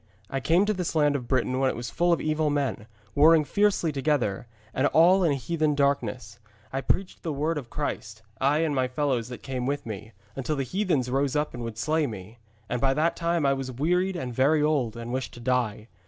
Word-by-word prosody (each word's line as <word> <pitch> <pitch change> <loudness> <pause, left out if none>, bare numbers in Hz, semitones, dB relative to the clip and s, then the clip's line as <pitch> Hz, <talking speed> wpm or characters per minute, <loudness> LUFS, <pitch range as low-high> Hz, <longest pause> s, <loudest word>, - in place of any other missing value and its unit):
I 135 - -1
came 170 +8 +3
to 215 - +1
this 180 -4 -3
land 145 -2 +3
of 125 -4 -3
Britain 130 0 0
when 135 -1 +3
it - - -3
was 120 0 -5
full 175 0 +2
of 170 - +3
evil 155 0 0
men, 140 -6 -2 0.3
warring 155 +2 +6
fiercely 200 -3 +2
together, 135 -8 -1 0.3
and 130 +2 +2
all 180 +6 +5
in 160 -4 +3
heathen 155 +2 0
darkness. 125 -5 -1 0.3
I 135 - -1
preached 185 +6 -1
the 165 - -3
Word 150 +2 -1
of 125 -5 -11
Christ, 110 -7 -4 0.2
I 145 +4 +3
and 155 - -1
my 130 -2 +1
fellows 125 -3 -1
that 125 - -9
came 130 -2 -3
with 145 +1 -2
me, 110 0 -7 0.2
until 135 +3 -2
the 135 - -1
heathens 145 - 0
rose 135 +1 0
up 150 0 0
and 120 - -6
would 115 -2 -5
slay 155 +5 +1
me. 110 +1 -9 0.3
And 125 - -2
by 135 -1 +2
that 160 +3 +1
time 170 -2 0
I 140 - +4
was 135 -1 -4
wearied 180 +8 0
and 130 -8 -4
very 145 +5 +3
old, 135 -7 0
and 115 +1 -6
wished 130 -1 -3
to - - -10
die. 120 -3 -1
140 Hz, 220 wpm, -26 LUFS, 125-155 Hz, 0.3 s, warring